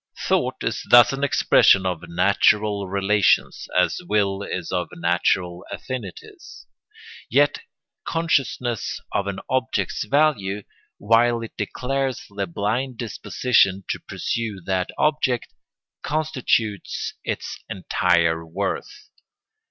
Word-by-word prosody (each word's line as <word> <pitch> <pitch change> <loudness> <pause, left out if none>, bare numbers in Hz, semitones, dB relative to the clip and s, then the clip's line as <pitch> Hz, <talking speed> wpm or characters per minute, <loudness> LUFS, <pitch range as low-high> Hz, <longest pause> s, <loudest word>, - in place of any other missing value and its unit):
] - - -6
Thought - - 0
is - - -2
thus 120 +2 +8
an 135 +1 -3
expression 100 -8 +4
of 90 -3 -2
natural 100 +3 +2
relations, 100 +1 +1
as - - +2
will 100 -2 +1
is 90 -4 -4
of 90 -2 -1
natural 90 +1 0
affinities; 120 -9 -8 0.6
yet 145 +4 +3 0.4
consciousness 135 - -1
of 100 - -1
an 100 -1 -3
object's 130 0 -1
value, 110 -10 +1 0.3
while 115 +2 +3
it 115 - -8
declares 130 +4 -2
the 100 -1 -2
blind 115 +8 -2
disposition 110 -3 +1
to - - -2
pursue 115 -4 -4
that 95 -1 -1
object, 150 -5 0 0.5
constitutes 130 - -1
its - - -4
entire 85 -3 +1
worth. 80 0 -5
105 Hz, 105 wpm, -23 LUFS, 95-130 Hz, 0.6 s, thus